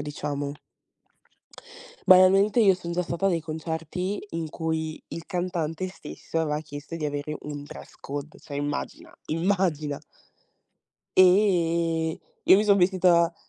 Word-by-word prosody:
diciamo. 145 -1 -4 1.6
Banalmente, 195 +4 +6
io 200 -5 +6
son 175 -2 -7
già 180 +1 0
stata 170 +2 -1
dei 170 -3 +1
concerti, 160 +4 -4
in 165 -2 -4
cui 160 -1 -3
il 165 - -7
cantante 175 -1 -2
stesso, 180 -3 -5
aveva 150 -1 -1
chiesto 145 +1 -8
di 160 - -4
avere 145 +1 -4
un 145 -1 -6
dress 145 - -11
code, 145 +2 -6
cioè, 140 - -8
immagina, 145 0 -4
immagina. 165 -4 0 1.1
E 170 -4 +3 0.3
io 185 - +8
mi 210 - +2
son 200 -1 +5
vestita 180 -2 +3
165 Hz, 125 wpm, -26 LUFS, 150-185 Hz, 1.6 s, io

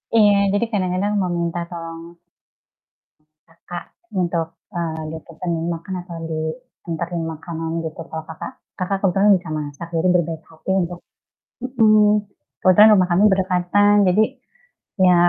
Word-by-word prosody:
Iya, 205 -2 +6 0.2
jadi 205 +3 +2
kadang-kadang 190 +1 0
meminta 170 -1 -1
tolong 165 0 -8 1.3
kakak 175 +1 -9 0.4
untuk, 170 -2 0 0.3
eee, 160 -2 -2
dapetin 165 +2 -5 0.2
makan 170 +3 -6
atau 170 -2 -8
dianterin 170 0 -4
makanan 160 +1 -5
gitu, 160 +1 -6
kalau 160 0 -5
kakak 160 +10 -7 0.3
kakak 190 +2 -1
kebetulan 195 +2 +4
bisa 175 - -12
masak 150 +3 -6
jadi 175 +3 +2
berbaik 165 -2 0
hati 160 +3 -8
untuk 175 0 -5 0.6
mhm, 215 -4 +4 0.3
kebetulan 210 +4 +7
rumah 185 -2 +3
kami 180 +4 +3
berdekatan. 190 +2 +3
Jadi, 205 +4 +4 0.8
ya, 180 -1 +6
175 Hz, 120 wpm, -21 LUFS, 165-200 Hz, 1.3 s, kebetulan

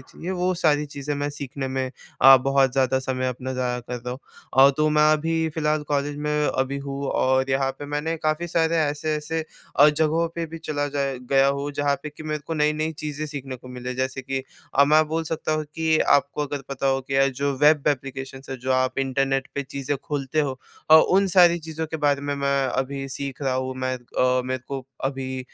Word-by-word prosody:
चाहिए 165 +7 -8
वो 185 0 0
सारी 150 -1 +3
चीज़ें 145 0 -4
मैं 145 +1 -2
सीखने 140 -1 -5
में 130 0 -2 0.3
अ, 135 0 +10
बहुत 135 0 +2
ज़्यादा 130 0 +2
समय 130 -1 -2
अपना 125 +1 -4
ज़ाया 125 -1 -1
कर 125 +1 -6
रहा 120 +1 -6
हूँ। 125 - -5 0.5
अ, - - +6
तो 155 0 +3
मैं 150 0 +5
अभी 160 +1 0
फ़िलहाल 155 -1 0
कॉलेज 145 0 -1
में 150 0 +1
अभी 135 +1 -1
हूँ 140 0 -4
और 130 +1 +1
यहाँ 135 0 +1
पे 145 - -7
मैंने 150 +3 -2
काफ़ी 155 +2 -1
सारे 165 0 +1
ऐसे-ऐसे 155 +1 -1 0.3
अ, 145 +2 +8
जगहों 160 +2 +1
पे 170 - -2
भी 165 +1 -8
चला 150 -2 -2
जाया 140 -1 -1 0.2
गया 135 0 +5
हूँ 140 +1 -1
जहाँ 145 0 +1
पे 150 - -5
कि 150 - -12
मेरे 155 -1 -2
को 165 - -3
नई-नई 155 +1 +1
चीज़ें 150 0 -4
सीखने 135 -3 -6
को 125 +1 -14
मिलें। 125 0 -6
जैसे 130 +1 -2
कि 135 0 -3 0.4
अब 140 - +7
मैं 155 +2 +5
बोल 160 +1 -1
सकता 160 -1 -2
हूँ 155 0 -1
कि 160 -1 +2
आपको 140 +1 +2
अगर 140 -1 -5
पता 135 0 -2
हो 135 0 +2
कि 135 +1 -6
अ, 135 0 +5
जो 140 +1 -1
वेब 150 0 +4
एप्लीकेशन्स 135 -1 -4
हैं, 135 - -4
जो 130 +2 -1
आप 130 0 +1
इंटरनेट 135 0 0
पे 140 - -1
चीज़ें 140 +1 -3
खोलते 145 0 -1
हो 135 -3 -2 0.3
और 160 - +10 0.2
उन 195 0 +4
सारी 175 -2 +5
चीज़ों 160 0 -5
के 160 +1 -4
बारे 145 -2 +1
में, 145 0 -2
मैं 140 -1 +1
अभी 135 +2 -2
सीख 135 0 -6
रहा 135 -2 0
हूँ। 130 0 -2
मैं 130 0 -1
अ, 125 +1 0
मेरे 130 -1 -3
को 135 -2 -4 0.2
अभी 130 -1 -3
140 Hz, 215 wpm, -24 LUFS, 130-150 Hz, 0.5 s, अ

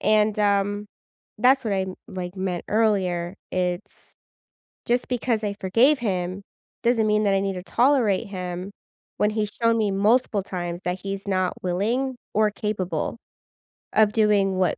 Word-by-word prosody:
And, 215 0 +3
um, 205 0 +1 0.5
that's 260 +4 +4
what 215 - -1
I 190 - +1
m 190 0 -5
like, 180 -1 -5
meant 185 -2 -2
earlier. 190 -5 +1 0.2
It's 180 +1 -3 0.7
just 245 +1 +1
because 235 -3 0
I 205 -1 -1
forgave 240 +10 +4
him 185 -3 -2 0.4
doesn't 235 -2 +2
mean 210 0 +2
that 200 - +3
I 195 - +2
need 195 0 -1
to 180 - -6
tolerate 235 -4 +2
him 180 -1 -5 0.5
when 210 - +3
he's 210 -1 -1
shown 230 0 +4
me 215 -2 +1
multiple 205 +1 +2
times 175 -2 -4
that 180 +1 -2
he's 195 0 -5
not 185 -2 +1
willing 230 +9 0 0.2
or 215 0 +3
capable 205 -3 -3 0.8
of 215 -1 +4
doing 205 -3 +3
what 185 -4 +1
200 Hz, 155 wpm, -24 LUFS, 185-220 Hz, 0.8 s, that's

